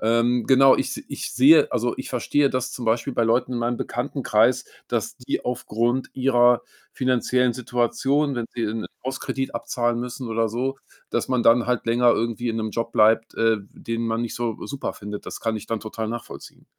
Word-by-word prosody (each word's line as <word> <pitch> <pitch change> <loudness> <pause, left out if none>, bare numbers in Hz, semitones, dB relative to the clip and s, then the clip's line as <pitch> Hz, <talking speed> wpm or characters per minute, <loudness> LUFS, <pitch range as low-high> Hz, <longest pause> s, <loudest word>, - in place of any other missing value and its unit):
ähm, 115 +2 +2
genau, 135 0 +6
ich - - -1
s - - -9
ich - - -5
sehe 145 +4 +6
also, 120 +1 0
ich 130 - -5
verstehe, 140 +3 +1
dass 130 0 -2
zum 120 - -6
Beispiel 115 +4 +1
bei 120 - +1
Leuten 120 +3 +1
in 120 - -1
meinem 120 +1 -1
Bekanntenkreis, 125 -2 +1 0.2
dass 115 -3 -2
die 125 - -3
aufgrund 120 +1 -1
ihrer 125 -2 +4 0.3
finanziellen 125 -1 +1
Situation, 130 +4 0
wenn 120 -2 -3
sie 120 - -3
'nen 110 0 -3 0.2
Hauskredit 135 0 -3
abzahlen 120 0 -1
müssen 125 0 -5
oder 115 0 0
so, 130 +4 -2 0.3
dass 120 - -1
man 125 -2 +1
dann 120 +1 +5
halt 125 -2 0
länger 120 +1 +4
irgendwie 115 +1 -1
in 115 - -2
'nem 110 -1 -2
Job 115 +1 -3
bleibt, 110 +1 +3
äh, 115 -1 +3 0.2
den 115 0 -4
man 115 +1 -1
nicht 120 - -4
so 120 -2 -3
super 140 -1 -4
findet. 105 0 -8
Das - - -6
kann 115 -1 -1
ich 110 - -8
dann 115 -1 -2
total 110 0 -5
nachvollziehen. 120 +1 -8
120 Hz, 195 wpm, -23 LUFS, 115-125 Hz, 0.3 s, genau